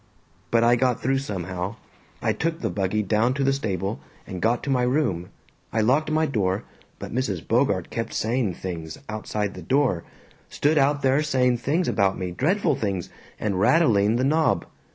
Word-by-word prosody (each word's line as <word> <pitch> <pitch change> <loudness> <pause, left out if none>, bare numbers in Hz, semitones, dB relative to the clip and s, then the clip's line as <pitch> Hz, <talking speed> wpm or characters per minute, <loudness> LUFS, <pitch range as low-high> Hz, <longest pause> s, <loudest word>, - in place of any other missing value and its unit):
But 115 0 +3
I 120 +1 +5
got 125 -1 +1
through 135 +1 +1
somehow. 95 -4 -4 0.5
I - - +2
took 165 0 -2
the - - -1
buggy 100 +2 0
down 110 +5 +1
to 140 - 0
the 135 0 +3
stable, 100 -6 -2 0.3
and 95 -2 -6
got 115 +2 +1
to 140 - -1
my 125 -2 +2
room. 125 - 0 0.4
I 110 - +1
locked 135 +9 +2
my 155 +1 +2
door, 105 -7 0 0.3
but - - -7
Mrs. 115 -9 -2
Bogart - - +1
kept - - -3
saying 115 -5 0
things, 80 -4 -6
outside 105 -1 -3
the - - -9
door. 130 -11 +1 0.5
Stood 150 +1 +2
out 140 +1 +2
there 135 +2 +3
saying 125 -5 +2
things 155 +9 0
about 95 -1 +2
me, 90 -1 -3
dreadful 155 - +1
things, 100 -8 -3 0.3
and 100 -3 -1
rattling 110 - +4
the 125 - +1
knob. 155 +4 +2
120 Hz, 175 wpm, -24 LUFS, 100-140 Hz, 0.5 s, I